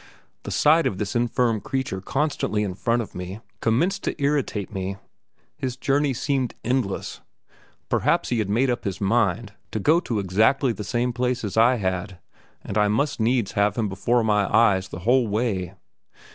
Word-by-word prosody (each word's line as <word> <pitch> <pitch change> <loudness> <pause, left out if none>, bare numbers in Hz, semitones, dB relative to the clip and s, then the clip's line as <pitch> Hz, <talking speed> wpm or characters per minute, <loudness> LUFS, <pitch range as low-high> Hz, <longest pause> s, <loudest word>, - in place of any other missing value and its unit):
The - - -7
sight 160 +2 +4
of 95 - -3
this 100 +2 -3
infirm 120 -2 +1
creature 130 -8 -3
constantly 135 -3 -1
in 100 -3 -3
front 115 +5 0
of - - -13
me, 90 +3 -6 0.2
commenced 165 - +1
to - - -3
irritate 140 -8 -1
me 95 0 -3 0.6
his 130 -1 -4
journey 140 +2 +1
seemed 130 -1 -1
endless; 125 -5 -2 0.7
perhaps - - +1
he 120 - 0
had 105 -3 -1
made 125 +5 +2
up 120 - -3
his 95 -2 -3
mind 110 0 +1 0.2
to 110 - -3
go 155 +11 +4
to 120 -10 -3
exactly 110 +8 +2
the 105 - -6
same 120 +3 -1
place 125 0 -1
as 105 - -4
I 115 +3 +5
had, 95 -3 -3 0.5
and 105 - -2
I 105 - +4
must 135 +8 0
needs 115 -1 +1
have 100 0 +1
him 110 -2 0
before 115 +5 +1
my 105 -2 +1
eyes 100 -5 +4
the 90 - -7
whole 125 0 +4
way. 100 -4 -1
115 Hz, 175 wpm, -24 LUFS, 100-125 Hz, 0.7 s, I